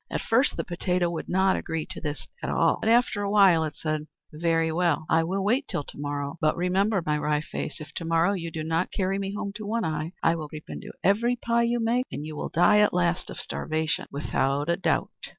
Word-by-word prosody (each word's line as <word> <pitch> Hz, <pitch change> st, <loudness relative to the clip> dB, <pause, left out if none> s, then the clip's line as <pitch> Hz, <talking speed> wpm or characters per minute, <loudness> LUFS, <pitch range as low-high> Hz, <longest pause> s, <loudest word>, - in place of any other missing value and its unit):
At -, -, -2 dB
first 255 Hz, +6 st, +2 dB
the -, -, -1 dB
potato 175 Hz, 0 st, 0 dB
would 170 Hz, -, -5 dB
not 190 Hz, +1 st, +3 dB
agree 160 Hz, -1 st, -3 dB
to -, -, -7 dB
this 145 Hz, -1 st, -4 dB, 0.2 s
at -, -, -3 dB
all, 165 Hz, -1 st, +2 dB
but 220 Hz, -, +1 dB
after 235 Hz, -2 st, +3 dB
a 200 Hz, -, -1 dB
while 195 Hz, -6 st, +5 dB
it 155 Hz, -2 st, -4 dB
said, 155 Hz, -1 st, -3 dB, 0.3 s
"Very 165 Hz, 0 st, +1 dB
well, 165 Hz, -2 st, +1 dB
I 165 Hz, 0 st, +4 dB
will 190 Hz, +4 st, -1 dB
wait 250 Hz, +8 st, +1 dB
till 145 Hz, -, -2 dB
to -, -, -12 dB
morrow. 145 Hz, +1 st, -3 dB
But 155 Hz, -, +2 dB
remember, 190 Hz, +2 st, +1 dB
my 150 Hz, 0 st, +1 dB
Wry 150 Hz, 0 st, +1 dB
Face, 150 Hz, 0 st, -5 dB
if 155 Hz, -2 st, -9 dB
to 165 Hz, -, -4 dB
morrow 165 Hz, +4 st, +3 dB
you 170 Hz, -4 st, -3 dB
do 160 Hz, -1 st, -5 dB
not 165 Hz, +3 st, 0 dB
carry 195 Hz, 0 st, 0 dB
me 195 Hz, 0 st, -3 dB
home 200 Hz, -1 st, -4 dB
to 215 Hz, -, -7 dB
One 225 Hz, +1 st, 0 dB
Eye, 155 Hz, +2 st, -3 dB
I 165 Hz, -, +4 dB
will 155 Hz, -2 st, -6 dB
creep 155 Hz, 0 st, -9 dB
into -, -, -7 dB
every 230 Hz, +6 st, +3 dB
pie 235 Hz, -1 st, +1 dB
you 240 Hz, 0 st, +1 dB
make; 235 Hz, +3 st, +1 dB
and 150 Hz, -, -5 dB
you 155 Hz, 0 st, -6 dB
will -, -, -4 dB
die 175 Hz, +5 st, +5 dB
at 210 Hz, -3 st, +3 dB
last 175 Hz, 0 st, +1 dB
of -, -, -7 dB
starvation 160 Hz, 0 st, -2 dB
without 140 Hz, +1 st, -1 dB
a 170 Hz, -, +3 dB
doubt!" 190 Hz, -, 0 dB
170 Hz, 240 wpm, -26 LUFS, 155-200 Hz, 0.3 s, while